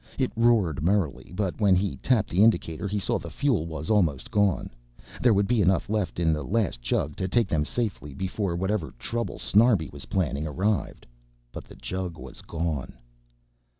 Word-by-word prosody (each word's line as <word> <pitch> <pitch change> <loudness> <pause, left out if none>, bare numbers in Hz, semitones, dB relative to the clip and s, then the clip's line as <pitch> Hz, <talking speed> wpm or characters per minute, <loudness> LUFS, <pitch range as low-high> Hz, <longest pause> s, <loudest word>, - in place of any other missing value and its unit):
It 130 -2 0
roared 110 - +3
merrily 85 -4 0
but 100 +1 -2
when 100 -3 +5
he 95 +1 0
tapped 115 -6 +1
the 90 - +3
indicator 100 -5 +2
he 105 +1 -2
saw 100 - 0
the - - -8
fuel 125 - 0
was 80 +1 -4
almost 95 - +1
gone. 105 -4 +1 0.5
There 125 - +5
would 100 -1 +3
be 120 -2 +2
enough 95 +2 +2
left 105 -5 -1
in 80 -2 +3
the 75 - -2
last 95 - -1
jug 65 +4 -1
to 95 - -1
take 115 +2 +2
them 80 -5 +1
to - - -5
safety 100 - -3
before 95 +2 -2
whatever 95 - -2
trouble 115 - -3
Snarbi 105 -6 +3
was 70 -1 -8
planning 80 -5 -1
arrived. 95 +7 -1 0.5
But - - -8
the - - -14
jug 90 -3 -5
was - - -10
gone. 80 -5 -3
95 Hz, 185 wpm, -26 LUFS, 80-105 Hz, 0.5 s, when